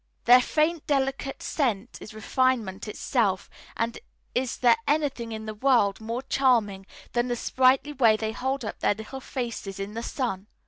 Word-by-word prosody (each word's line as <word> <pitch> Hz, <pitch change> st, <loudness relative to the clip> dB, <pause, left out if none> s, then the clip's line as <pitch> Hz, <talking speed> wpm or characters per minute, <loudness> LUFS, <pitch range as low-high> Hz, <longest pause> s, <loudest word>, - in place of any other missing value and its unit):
Their 250 Hz, +1 st, +8 dB
faint, 310 Hz, +4 st, 0 dB
delicate 270 Hz, -1 st, -1 dB
scent 245 Hz, -6 st, -1 dB
is -, -, -9 dB
refinement 225 Hz, -3 st, 0 dB
itself; 210 Hz, -, -1 dB, 0.3 s
and 230 Hz, 0 st, -2 dB, 0.3 s
is 250 Hz, -1 st, -1 dB
there 240 Hz, -2 st, +5 dB
anything 285 Hz, -6 st, 0 dB
in 220 Hz, 0 st, -6 dB
the 215 Hz, -, -5 dB
world 220 Hz, -4 st, +2 dB
more 230 Hz, +3 st, -4 dB
charming 225 Hz, -8 st, +1 dB, 0.3 s
than 240 Hz, 0 st, +1 dB
the 245 Hz, -, -1 dB
sprightly 260 Hz, +4 st, +2 dB
way 230 Hz, -6 st, +4 dB
they 220 Hz, 0 st, -2 dB
hold 265 Hz, +2 st, -2 dB
up -, -, -6 dB
their 205 Hz, -, +2 dB
little 220 Hz, +5 st, -8 dB
faces 235 Hz, -7 st, -5 dB
to 195 Hz, -, -3 dB
the 215 Hz, +3 st, -6 dB
sun. 230 Hz, -6 st, -3 dB
240 Hz, 165 wpm, -26 LUFS, 215-265 Hz, 0.3 s, Their